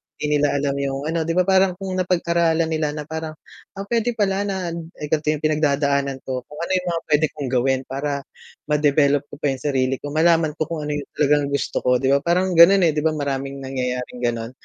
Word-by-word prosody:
di 150 - -3
nila 145 0 +3
alam 140 -1 0
yung, 135 -1 -2
ano, 165 0 0
'di - - 0
ba 180 - +4
parang 190 -1 +3
kung 190 0 -6
napag-aralan 170 -2 +1
nila 155 -1 -1
na 150 - -4
parang, 160 0 -6 0.4
ah, 195 - -5
pwede 235 +1 0
pala 200 -2 0
na 190 -3 -3 0.3
eh, 150 - -4
ganto 155 -1 0
yung 155 0 -4
pinagdadaanan 140 -3 +1
ko, 130 -1 -3
kung 150 - -12
ano 170 - -3
yung 185 -1 0
mga 165 - -2
pwede 150 +1 +4
kong 140 -4 -4
gawin 130 +1 +1
para 140 +1 -3 0.5
ma-develop 145 -1 +3
ko - - -10
pa 145 - +1
yung 130 - -5
sarili 135 -2 +1
ko, 145 +1 -7
malaman 165 -1 +3
ko 155 - -2
kung 150 -2 -3
ano 150 - -2
yung 145 - -6
talagang 145 0 +3
gusto 140 - -2
ko. 125 -1 +3
Di 135 - 0
ba 140 - 0
parang 180 +1 +1
ganun 180 +3 +7
eh, 155 - 0
'di 150 - -1
ba 160 - +3
maraming 140 -1 -3
nangyayaring 125 -2 -4
ganon. 115 0 -2
150 Hz, 220 wpm, -22 LUFS, 140-170 Hz, 0.5 s, ganun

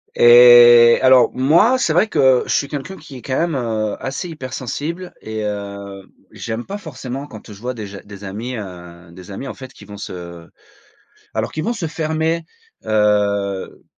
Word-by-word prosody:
Et 120 0 +8
alors 130 -1 +5
moi, 165 - +3
c'est 205 - +1
vrai 175 +7 +3
que 130 -9 +3
je - - -1
suis 140 - 0
quelqu'un 150 +7 -6
qui 145 -2 -13
est - - -11
quand 130 - -3
même, 170 -2 0
heu, 110 -4 -2
assez 135 +7 -5
hypersensible 150 +5 -6
et 110 0 -5
heu, 100 -1 -6 0.2
j'aime 115 +1 -6
pas 200 - -5
forcément 135 -6 -7
quand 110 -6 -12
je 100 - -12
vois 125 +3 -4
des 110 -4 -7
ja 100 0 -10
des 100 -1 -12
amis, 110 +6 -6
heu, 90 -4 -10
des 90 +3 -13
amis 115 +8 -7
en - - -7
fait 130 0 -11
qui 100 - -15
vont 100 0 -11
se 85 -3 -9 0.9
alors - - -2
qui - - -6
vont 200 +10 -1
se 195 -8 -4
fermer, 160 +1 -2 0.4
heu, 100 -2 0
120 Hz, 180 wpm, -19 LUFS, 100-145 Hz, 0.9 s, Et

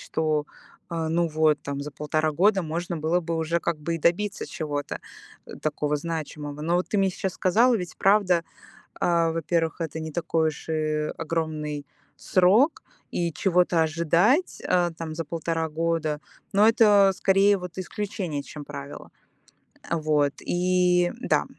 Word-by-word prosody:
что, 155 -2 -1 0.5
а, 165 -1 -2
ну, 170 +1 +1
вот 155 -1 +2
там 140 0 -4
за 150 - -6
полтора 155 +2 0
года 190 +4 +3
можно 170 +2 -3
было 160 +4 +1
бы 165 -1 -3
уже 160 +1 0
как 170 -2 -2
бы 165 +3 -2
и - - -7
добиться 200 +6 0
чего-то, 150 -6 -4 0.5
э, - - -9
такого 150 -1 0
значимого. 150 -2 -5
Но 170 +2 0
вот 180 - -1
ты 210 - +1
мне 195 - +3
сейчас 190 0 -3
сказала, 230 +7 +3
ведь 180 -4 -6
правда, 195 -4 +3 0.6
а, 170 -1 +2
во-первых, 165 0 -1
это 160 0 -3
не 160 0 -5
такой 160 -1 0
уж 155 - -10
и 155 -1 -1
огромный 155 -3 -3 0.3
срок, 205 - +3 0.3
и 170 -2 -1
чего-то 180 -2 +2
ожидать, 170 - +2
э, 175 -1 +2
там, 160 -1 -5
за 165 - -4
1.5 165 +1 -2
года- 160 -1 -1 0.3
но 210 +2 +5
это 205 -3 +6
скорее 195 +2 +4
вот 180 0 -8
исключение, 185 -6 -4
чем 150 - -9
правило. 70 0 -9 0.8
Вот, 150 -3 +1
и, 180 0 +2
да. - - +1
165 Hz, 155 wpm, -25 LUFS, 155-180 Hz, 0.8 s, это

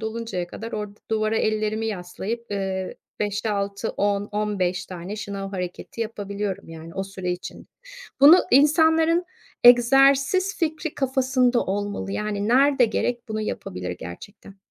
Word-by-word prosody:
doluncaya 220 -5 -4
kadar 225 +6 -8
orada 210 -1 -6
duvara 215 0 +1
ellerimi 215 0 0
yaslayıp, 210 +3 -5
ııı, 190 -2 -3 0.3
5-6-10-15 205 -2 -1
tane 185 +3 -7
şınav 200 -2 -5
hareketi 180 +3 -6
yapabiliyorum 200 -3 -4
yani 165 0 -10
o 195 - -2
süre 190 -2 -4
için. 180 - -8 0.5
Bunu 295 +5 +10
insanların 320 +4 +4 0.4
egzersiz 275 +9 +5
fikri 315 -1 -2
kafasında 255 -2 +1
olmalı. 205 0 -3
Yani 210 -1 -2
nerede 270 +1 +5
gerek 240 +2 -2
bunu 215 0 -3
yapabilir 90 - -4
gerçekten. 90 - -10
210 Hz, 115 wpm, -24 LUFS, 195-245 Hz, 0.5 s, Bunu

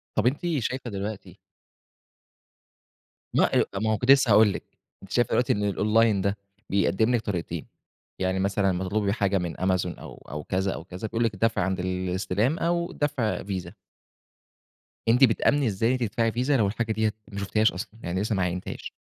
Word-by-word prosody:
طب 110 +2 +2
أنتِ 145 +7 0
شايفة 125 +1 -3
دلوقتي 100 0 -6 2.0
ما - - +4 0.2
أ - - +4
طب - - -4
ما 110 - +1
هو - - 0
كنت 125 +6 +4
لسّه 135 -5 +5
هاقول 105 -1 +6
لِك. - - -6 0.4
أنتِ 95 - -13
شايفة 120 - +2
الوقتي 125 - +2
إن 105 - -2
الأونلاين 105 +1 +2
ده، 100 +2 0 0.3
بيقدِّم 110 +4 +2
لِك 120 - 0
طريقتين، 95 -6 -4 0.5
يعني 95 0 0
مثلًا 100 0 +1
لما 90 +1 -2
تطلبي 100 +1 0
حاجة 100 -3 +1
من 85 -2 -3
أمازون 95 -1 0
أو - - -12
أو 75 0 -5
كذا، 95 +1 -1
أو - - -7
كذا، 95 +4 -6
بيقول 115 +2 -1
لِك 115 - +1
الدفع 110 0 +1
عند 95 0 -1
الاستلام، 95 - -1
أو 170 +1 0
الدفع 145 -9 -1
فيزا. 95 -3 -5 1.3
أنتِ 125 +4 +5
بتآمني 135 +3 +3
إزاي 115 +5 +1
تدفعي 115 -1 0
فيزا، 130 +4 +1
لو 105 -4 +3
الحاجة 110 +2 -2
ديّة 110 0 +1 0.2
ما 100 - -5
شفتيهاش 110 +2 +2
أصلًا، 90 - -6
يعني 90 +2 -2
لسه 105 0 0
ما 95 - +1
عاينتِيهاش؟ 90 +1 -4
105 Hz, 180 wpm, -26 LUFS, 95-115 Hz, 2.0 s, هاقول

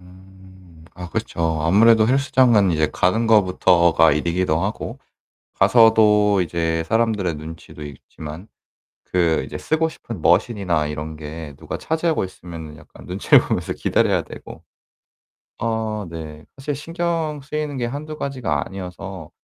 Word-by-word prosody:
음. 95 -2 -18
아 90 0 -8
그렇죠. 80 -1 -2
아무래도 110 +6 +5
헬스장은 125 -6 +3
이제 80 -2 +1
가는 110 +6 +1
것부터가 90 -6 +4
일이기도 85 +2 0
하고 110 +5 -4 0.6
가서도 105 -3 +5
이제 80 -1 -1
사람들의 105 -3 0
눈치도 75 0 -10
있지만 75 +4 -10 0.6
그 85 -3 +1
이제 - - -7
쓰고 160 +1 0
싶은 115 - -9
머신이나 90 -3 +2
이런 75 +1 -5
게 75 -1 -8
누가 - - -6
차지하고 160 - -1
있으면은 85 -4 -9
약간 - - -16
눈치를 95 +2 +4
보면서 - - -2
기다려야 - - +1
되고. 80 - -11 1.0
어 110 -2 -2
네. 80 -2 -8
사실 140 +2 -4
신경 165 0 -3
쓰이는 150 0 -4
게 120 - -1
1-2 150 +5 -6
가지가 135 -6 -2
아니어서 95 -2 -8
95 Hz, 300 characters per minute, -21 LUFS, 80-115 Hz, 1.0 s, 아무래도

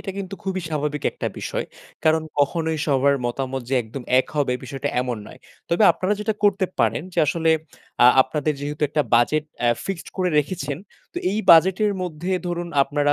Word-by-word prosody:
এটা 195 - -5
কিন্তু 195 0 -5
খুবই 190 -1 -2
স্বাভাবিক 150 -1 -2
একটা - - -4
বিষয়। - - -3 0.4
কারণ 160 0 +3 0.2
কখনোই 160 +3 +1
সবার 140 0 +3
মতামত 130 +1 -3
যে 135 - 0
একদম 115 +4 -8 0.2
এক - - -7
হবে 140 -3 +1
বিষয়টা 135 +1 -4
এমন 125 -2 -2
নয়। - - -13 0.3
তবে 170 +5 +2
আপনারা 185 +3 -1
যেটা 210 +1 -1
করতে 195 -2 +3
পারেন 115 0 +1
যে - - -4
আসলে 160 +2 +1 0.5
আ - - +10 0.2
আপনাদের 150 +3 -2
যেহেতু 145 +1 -5
একটা 150 +1 +1
বাজেট 150 +6 +3 0.2
অ্যা 120 - +2 0.2
ফিক্সড 190 -5 -5
করে 185 -1 +1
রেখেছেন 145 -2 -2 0.3
তো - - -19
এই 210 - -1
বাজেট 175 +3 +7
এর 205 - 0
মধ্যে 175 +1 -4 0.2
ধরুন, 175 0 -3
আপনারা 145 +1 +1
150 Hz, 185 wpm, -22 LUFS, 135-175 Hz, 0.5 s, আ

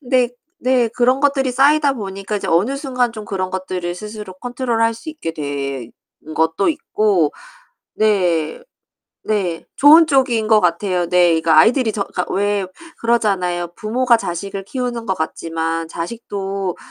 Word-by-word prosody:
근데 250 -3 +1 0.3
네 250 -2 +2
그런 250 +3 +1
것들이 275 -2 +2
쌓이다 285 +2 +4
보니까 195 -2 -4
이제 200 - -4
어느 200 +12 +2
순간 255 -4 -1
좀 215 -2 -8
그런 185 -2 -3
것들을 185 -2 -4
스스로 210 0 -8
컨트롤할 230 +1 -1
수 270 +8 -8
있게 300 - -5
된 140 -5 -4 0.4
것도 160 +4 +1
있고 210 - +1 0.6
네. 185 - +1 0.6
네. 190 -6 -1
좋은 315 +4 +8
쪽인 255 -7 +2
것 220 -1 +5
같아요. 180 +1 0
네, 175 -2 +4
그 165 - 0
아이들이 225 - +5
저 200 - -2
그러니까 180 - -4
왜 200 -1 0 0.3
그러잖아요. 190 -7 0
부모가 240 +3 +2
자식을 195 0 -5
키우는 245 +1 -4
것 190 - 0
같지만 165 0 -3
자식도 195 0 -4
205 Hz, 300 characters per minute, -19 LUFS, 175-245 Hz, 0.6 s, 좋은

